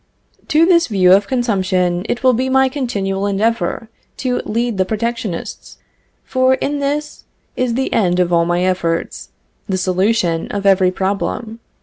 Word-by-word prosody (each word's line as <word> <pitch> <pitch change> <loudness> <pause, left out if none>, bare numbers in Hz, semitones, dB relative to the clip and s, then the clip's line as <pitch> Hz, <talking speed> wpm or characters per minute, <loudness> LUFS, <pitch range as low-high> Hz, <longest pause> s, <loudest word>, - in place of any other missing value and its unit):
To 315 +2 +4
this 340 -2 +4
view 185 -4 +4
of 200 +1 +3
consumption, 190 -6 0
it 240 - -2
will 255 -1 +5
be 255 +3 -1
my 265 0 +3
continual 200 -8 -2
endeavor 225 +3 -1 0.3
to 250 -2 -1
lead 230 -2 -2
the - - +4
protectionists; 220 -2 -4 0.5
for 260 0 +2
in 285 +2 -2
this 295 +2 -3 0.3
is 250 -2 -1
the 265 +1 -1
end 180 -4 +1
of 175 -1 +1
all 170 0 +4
my 175 +1 0
efforts, 170 -3 -2 0.4
the 190 - 0
solution 185 -2 0
of 200 -1 -4
every 190 -2 +4
problem. 200 +4 -3
210 Hz, 150 wpm, -17 LUFS, 185-255 Hz, 0.5 s, will